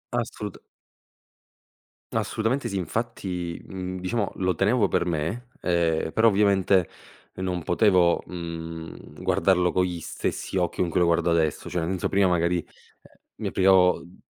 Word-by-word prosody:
A - - +2
assoluta - - -7 1.5
Assolutamente 115 +6 -1
sì. 100 - -3
Infatti, 90 -3 -3
mhmm, 95 -1 -5
diciamo 100 +3 -1
lo 95 -1 0
tenevo 105 +3 +3
per - - 0
me, 85 +9 -2
ehm, 85 -2 +1
però 110 +5 +4
ovviamente, 100 -3 +3 0.5
non 90 -2 -3
potevo, 90 -3 +3
mhmm, 85 -2 -7
guardarlo 90 -2 +3
con 90 - +2
gli 90 -2 -4
stessi 90 - -3
occhi 90 0 0
con 90 - +1
cui 90 - +1
lo 90 - +4
guardo 85 0 +2
adesso, 80 -2 0
cioè 90 -2 -1
non 95 +3 -1
so, - - -1
prima 100 0 +3
magari, 85 0 +2
ehm, - - -8 0.7
mi - - -3
privavo, 95 -1 +4
uhm, 85 +2 -16
90 Hz, 150 wpm, -25 LUFS, 85-95 Hz, 1.5 s, però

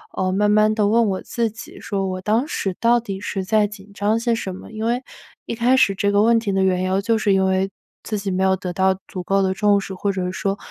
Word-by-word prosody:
呃， 185 0 0
慢 205 +2 +2
慢 215 +1 +4
地 210 -2 +2
问 230 +1 +3
我 190 -1 -2
自 230 -2 -2
己， 220 - -11
说 195 -2 -2
我 185 0 -4
当 220 +8 +1
时 195 - -3
到 235 +1 +4
底 195 -4 -6
是 195 -1 -3
在 215 +2 +2
紧 205 -1 -10
张 210 +3 0
些 235 0 +1
什 190 -4 -4
么， - - -11
因 220 0 -4
为 245 +3 0 0.4
一 - - -4
开 245 +3 +3
始 200 -6 +4
这 200 +1 +1
个 205 - +3
问 230 +1 +4
题 220 -3 -2
的 190 0 +2
缘 185 -1 +1
由 190 +1 0
就 225 +2 +1
是 205 -2 +2
因 190 0 +3
为 190 +1 +1 0.3
自 215 - -3
己 195 -1 -3
没 185 +1 0
有 190 0 +3
得 180 -1 -5
到 190 +1 +1
足 185 - -6
够 195 +2 +1
的 190 - +1
重 205 0 +3
视， 195 - -7
或 200 +2 -2
者 185 -1 -2
说 195 +1 -2
200 Hz, 285 characters per minute, -21 LUFS, 190-220 Hz, 0.4 s, 慢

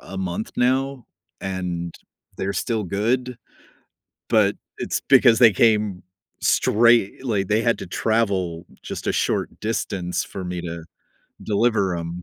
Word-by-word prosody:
a 95 - -10
month 95 +2 -3
now, 130 +1 +1 0.4
and 90 -3 -4 0.4
they're 95 +1 -2
still 110 +1 -1
good 120 +7 -1 0.9
but 105 -3 +4 0.2
it's - - -2
because 125 -4 +6
they 115 -4 +7
came 105 -3 +2 0.4
straight, 115 +1 +3
like, 105 -6 0
they 105 +1 +2
had 115 0 +1
to - - -7
travel 95 -5 0 0.2
just - - -6
a - - +1
short - - 0
distance 95 -5 -2
for 95 - -7
me 90 0 -4
to 85 -1 -6 0.6
deliver 105 -3 +1
'em. 85 +1 -5
105 Hz, 135 wpm, -22 LUFS, 90-115 Hz, 0.9 s, they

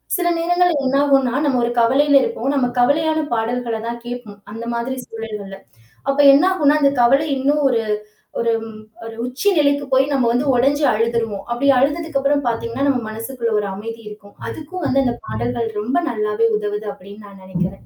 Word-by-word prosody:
சில 355 -1 0
நேரங்கள்ல 350 -1 +2
என்ன 260 +1 +1
ஆகுன்னா, 270 -4 +2
நம்ம 260 -4 +1
ஒரு 235 - +1
கவலையில 275 +5 +3
இருப்போம். 465 - -2
நம்ம 265 -3 +1
கவலையான 315 +5 +2
பாடல்கள 235 +1 -1
தான் 235 0 -5
கேட்போம். 240 -4 -8
அந்த 225 +2 -7
மாதிரி 235 +3 -3
சூழல்கள்ல. 210 -3 -7 0.5
அப்போ 275 +1 +2
என்ன 280 +5 +5
ஆகுன்னா, 300 -5 +3
அந்த 280 - +4
கவலை 275 +6 +3
இன்னும் 290 +3 +1
ஒரு 235 -3 +1 0.6
ஒரு, 235 0 +1 0.5
ஒரு 225 - -7
உச்சி 260 +12 0
நிலைக்கு 285 -1 +2
போய் 265 +1 +4
நம்ம 255 -4 +2
வந்து 245 +4 0
உடைஞ்சு 280 +4 +2
அழுதுருவோம். 225 -2 -1
அப்பிடி 245 +4 +1
அழுததுக்கு 295 +2 0
அப்புறம் 285 0 +1
பாத்தீங்கன்னா, 230 +3 -2
நம் 250 -5 0
மனசுகுள்ள 230 +2 -4
ஒரு 205 - -2
அமைதி 225 +3 -7
இருக்கும். 205 -1 -14
அதுக்கும் 340 +4 -7
வந்து 275 0 +2
அந்த 245 -2 0
பாடல்கள் 120 - -2
ரொம்ப 235 +8 -1
நல்லாவே 215 0 0
உதவுது 210 0 -4
அப்பிடின்னு 200 +3 -13
நான் 195 -1 -14
நினைக்கிறேன். 185 +1 -4
245 Hz, 170 wpm, -19 LUFS, 225-285 Hz, 0.6 s, என்ன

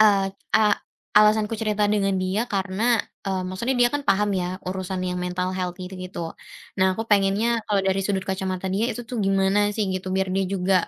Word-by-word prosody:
eee, 200 -2 +5 0.2
a 220 - +5 0.6
alasanku 215 +1 +5
cerita 210 -1 +1
dengan 200 -2 +2
dia 190 +5 0
karena 205 +2 +1 0.2
e - - -3 0.2
maksudnya 235 +8 -1
dia 240 - +6
kan 290 +2 -3
paham 205 +2 +2
ya, 180 +1 -3
urusan 185 0 -3
yang 180 - -2
mental 180 +1 -1
health 180 0 -3
gitu 185 +1 -7
gitu. 185 -1 -6 0.6
Nah, 190 -1 +3
aku 220 - -3
pengennya 210 +3 +2
kalau 205 -2 +1
dari 195 0 +1
sudut 195 -1 0
kacamata 190 0 -2
dia 195 +4 0
itu - - -6
tuh 245 - -4
gimana 195 +1 +2
sih 215 0 0
gitu, 185 0 -4
biar 190 0 +1
dia 195 - +2
juga 190 0 +1
195 Hz, 195 wpm, -24 LUFS, 185-210 Hz, 0.6 s, dia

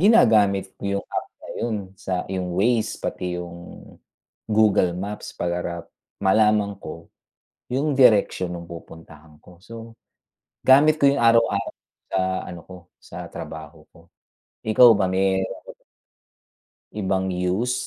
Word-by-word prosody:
ginagamit 110 - +4
ko - - -17 0.2
yung - - -18
app - - -3
na - - -11
'yon 115 -2 -1 0.2
sa 95 - -3 0.2
yung 90 -2 -3
Waze 110 +2 +1
pati 90 -1 -4
yung 85 0 -8 0.9
Google 105 -4 +3
Maps 100 +3 -6
para 85 -1 -3 0.4
malaman 105 0 +3
ko 80 +1 -9 0.7
yung 145 +3 0
direksyon 100 -7 +4
nung 85 -1 -8
pupuntahan 80 -2 -13
ko. 90 - -17
So, 115 +2 -11 0.7
gamit 145 +4 +6
ko - - +5
'yon 140 - +2
araw-araw 115 -3 +3 0.4
sa 95 - 0 0.3
ano 85 -1 -8
ko, 95 - -11 0.2
sa - - -9
trabaho 80 0 -9
ko. 85 +1 -20 0.6
Ikaw 115 +3 +7
ba, 100 - +1
me 95 0 +1 1.5
Ibang 95 -2 -1
use, 90 +7 -1
95 Hz, 125 wpm, -23 LUFS, 90-115 Hz, 1.5 s, Ikaw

